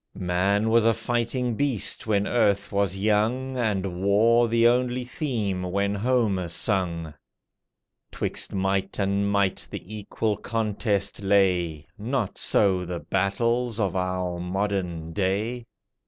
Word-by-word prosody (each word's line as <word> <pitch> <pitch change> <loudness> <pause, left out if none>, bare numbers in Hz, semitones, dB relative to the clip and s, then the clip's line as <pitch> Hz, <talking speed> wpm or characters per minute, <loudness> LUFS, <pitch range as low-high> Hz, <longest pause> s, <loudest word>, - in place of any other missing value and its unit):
Man 100 +4 +1
was 115 0 +5
a 115 0 +3
fighting 120 +1 -1
beast 125 -4 0
when 100 -2 +2
earth 100 -4 +1
was 100 -2 0
young, 110 +6 +1
And 100 -7 -1
war 115 +4 +4
the 115 0 +2
only 125 +1 +1
theme 115 - -2
when 100 +2 -1
Homer 105 -4 +1
sung. 85 -3 -1 1.0
'Twixt - - -2
might 95 0 -1
and 100 0 0
might 100 -2 0
the 100 +5 -8
equal 105 0 -2
contest 105 -3 -1
lay, 90 -6 +2
Not 115 -1 -2
so 95 -3 +2
the 90 -1 -4
battles 110 +7 0
of 95 -4 0
our 90 -1 -2
modern 90 -3 -2
day. 105 +6 -1
100 Hz, 125 wpm, -25 LUFS, 95-115 Hz, 1.0 s, was